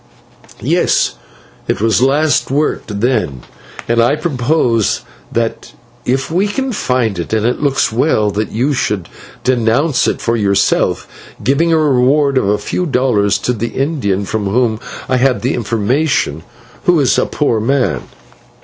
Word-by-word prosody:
"Yes, - - +2 0.5
it - - -1
was 110 +1 +2
last 145 +4 +2
worked 135 -7 -1
then, 90 - 0 0.4
and 115 0 +2
I 120 +5 +3
propose 125 - 0 0.3
that 115 -1 -3 0.3
if 130 +4 -1
we 185 +5 +2
can 265 +5 -2
find 125 - -1
it, 85 - -4
and 110 0 +1
it 125 +3 0
looks 140 -5 +1
well, 110 -3 +1
that 105 +2 -3
you 130 +7 0
should 100 -9 -2 0.3
'denounce' 125 +4 +2
it - - -1
for 115 - 0
yourself, 100 -3 +1 0.4
giving 155 +6 +2
a 165 - +4
reward 140 -1 +3
of 100 - -1
a 105 - +2
few 180 - -3
dollars 125 -7 +2
to 125 - +1
the 115 0 -4
Indian 120 - -1
from 105 0 -2
whom 110 +1 +1 0.3
I 130 - +1
had 130 -1 +1
the 125 - +1
information, 115 - 0 0.4
who 175 -2 +4
is 135 -3 +3
a - - +1
poor 130 -7 0
man." 115 - 0
125 Hz, 150 wpm, -15 LUFS, 110-140 Hz, 0.5 s, a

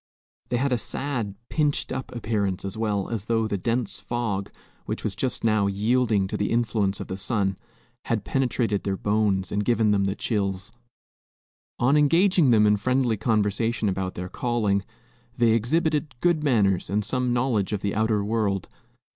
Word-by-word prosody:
They 120 - +1
had 135 +2 0
a 120 - +1
sad, 115 -4 -3
pinched 150 -2 0
up 130 -1 -4
appearance 105 -5 -1
as 100 - -5
well, 105 -3 -1
as 110 -4 -3
though 115 -1 +1
the 110 - -1
dense 120 +5 -1
fog, 110 -5 -3 0.4
which - - -4
was 105 - -2
but 105 - -15
just 125 -1 -1
now 110 -3 +3
yielding 105 +1 +1
to - - -3
the 105 - -1
influence 110 -4 0
of - - -5
the 95 - -5
sun, 100 -2 -1 0.5
had 115 -3 -1
penetrated 120 -6 0
their 95 -1 -1
bones 100 -3 0
and 105 0 0
given 115 -2 +2
them 100 -1 +2
the 95 0 -1
chills. 100 -5 -2 1.1
On 130 +4 +3
engaging 165 +2 +4
them 110 -3 +5
in 105 0 +4
friendly 125 +1 +1
conversation 110 +1 0
about 95 -1 -2
their 90 0 -4
calling, 105 -3 0 0.5
they 120 -1 +4
exhibited 150 +5 +1
good 170 -1 +2
manners 100 - +2
and 105 +2 0
some 125 0 0
knowledge 120 -6 +1
of 105 -2 -2
the 100 - -1
outer 110 -1 +1
world. 105 -3 -1
110 Hz, 170 wpm, -25 LUFS, 100-125 Hz, 1.1 s, them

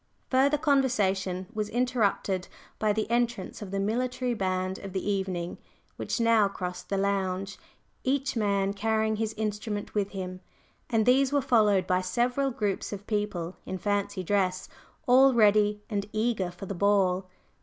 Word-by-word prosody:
Further 275 +3 +4
conversation 205 - +1
was 215 -1 -2
interrupted 220 -6 0 0.3
by 215 -1 +2
the 215 +1 -1
entrance 235 -5 -1
of 205 - -6
the 195 +1 -2
military 245 +4 -1
band 185 -2 -1
of 195 -2 -8
the 190 +1 -3
evening, 190 -4 -2 0.4
which - - -3
now 230 -3 +4
crossed 180 -2 -6
the 195 - 0
"lounge," 195 -1 -1 0.4
each 270 +1 0
man 200 -3 +1
carrying 220 +1 0
his 220 0 -2
instrument 210 -1 -3
with 205 -2 0
him; 185 -2 -6 0.5
and 225 -2 +2
these 260 +2 +4
were 285 - +3
followed 215 -8 +3
by 185 0 +1
several 245 +9 0
groups 210 -6 -2
of 205 -1 -6
people 205 -5 -2
in 190 - -5
fancy 205 0 -1
dress, 185 -1 0 0.4
all 260 0 +6
ready 210 -1 +4
and 200 -3 -2
eager 215 -4 0
for 175 +2 -9
the 200 - -4
ball. 190 -1 +2
205 Hz, 155 wpm, -28 LUFS, 190-230 Hz, 0.5 s, all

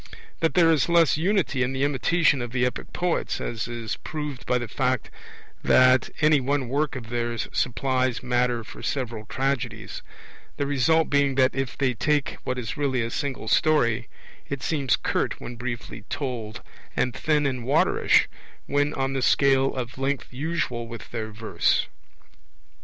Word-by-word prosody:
(4) - - -14 0.2
That 165 -2 +1
there 165 -2 +6
is 155 -1 +2
less 170 -3 +5
unity 170 -4 +1
in 130 +1 0
the 135 +1 -1
imitation 145 +1 +2
of 120 -1 -5
the 125 -1 +2
epic 125 - -4
poets, 175 -1 -1
as 115 -1 -3
is 115 -2 -4
proved 150 -5 -6
by 125 - +3
the 120 -1 -4
fact 130 +1 -1 0.5
that 130 0 +5
any 150 -1 +5
one 135 -1 -1
work 145 +2 0
of 120 -3 -7
theirs 120 -1 -2
supplies 130 -1 0
matter 125 -1 +1
for - - -11
several 115 -5 -3
tragedies; 135 0 -2 0.6
the 140 - 0
result 145 +4 +2
being 140 -2 +3
that, 130 0 +4
if 135 -3 -3
they 130 -2 +1
take 145 +4 0
what 130 -1 -2
is 120 +3 -4
really 135 -4 0
a 115 - -4
single 135 -5 -3
story, 120 -4 +2 0.4
it 140 -2 -4
seems 140 -6 +1
curt - - -1
when 120 - -7
briefly 120 0 -6
told, 120 -6 -4 0.3
and 125 - +1
thin 150 -2 +1
and 130 -3 -1
waterish 130 +4 +3 0.4
when 145 +1 0
on 135 0 -1
the 135 - -1
scale 135 +1 +3
of 130 0 -5
length 135 -1 -2
usual 130 -5 -2
with 115 -1 -9
their 110 -2 -4
verse. 105 -5 +1
130 Hz, 165 wpm, -25 LUFS, 120-145 Hz, 0.6 s, there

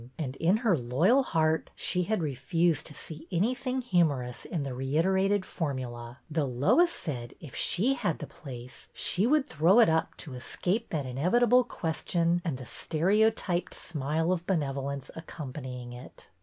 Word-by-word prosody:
and, 135 -5 -4
in 180 +8 +3
her 200 -6 +5
loyal 155 - +3
heart, 160 -9 +1
she 180 - +1
had 215 -4 0
refused 150 +3 0
to 150 - -8
see 160 +1 -8
anything 250 +8 0
humorous 150 - 0
in 165 -6 -3
the 135 -2 -4
reiterated 185 +9 +1
for 150 -5 -2
mula; 120 -1 -7
though 155 -1 0
Lois 140 - +4
said 125 - -5
if 150 - -11
she 240 +9 +2
had 180 - -1
the - - -6
place 125 -3 -10
she 195 +5 +1
would 295 +1 +3
throw 175 - +4
it 230 - +7
up 160 0 0
to 145 - -7
escape 185 - -2
that 150 -4 -2
inevitable 215 - +3
ques 165 -9 -4
tion 170 0 +2
and 160 -7 -2
the 130 - -9
stereotyped 185 - +1
smile 160 +2 -1
of 175 -1 -2
benevolence 140 -5 -2
accompanying 130 -6 -7
it. 125 - -12
160 Hz, 160 wpm, -29 LUFS, 135-190 Hz, -, it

